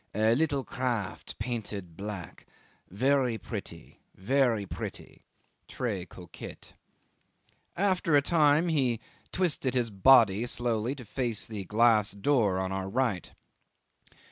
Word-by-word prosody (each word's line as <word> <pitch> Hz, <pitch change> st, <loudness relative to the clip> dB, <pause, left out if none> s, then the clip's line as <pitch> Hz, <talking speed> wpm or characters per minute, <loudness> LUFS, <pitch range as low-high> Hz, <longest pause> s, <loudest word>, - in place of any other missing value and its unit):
A 110 Hz, +2 st, +3 dB
little 140 Hz, 0 st, +1 dB
craft 120 Hz, -8 st, -3 dB
painted 105 Hz, -7 st, -5 dB
black 95 Hz, -5 st, -7 dB, 0.4 s
very 125 Hz, +3 st, +1 dB
pretty -, -, -8 dB, 0.2 s
very 120 Hz, 0 st, +1 dB
pretty -, -, -8 dB, 0.5 s
(tres 100 Hz, -8 st, -3 dB
coquet)." 90 Hz, -3 st, -11 dB, 1.0 s
After 185 Hz, -4 st, +2 dB
a -, -, +5 dB
time 155 Hz, +1 st, +3 dB
he 130 Hz, -8 st, +1 dB, 0.3 s
twisted 150 Hz, -8 st, 0 dB
his 120 Hz, -3 st, 0 dB
body 110 Hz, 0 st, +5 dB
slowly 120 Hz, +1 st, -1 dB
to 125 Hz, -4 st, -10 dB
face 115 Hz, -2 st, -2 dB
the 105 Hz, -3 st, -6 dB
glass 110 Hz, 0 st, +3 dB
door 100 Hz, -2 st, +2 dB
on 95 Hz, 0 st, -2 dB
our 95 Hz, 0 st, -3 dB
right. 115 Hz, -5 st, -1 dB
115 Hz, 115 wpm, -29 LUFS, 100-135 Hz, 1.0 s, a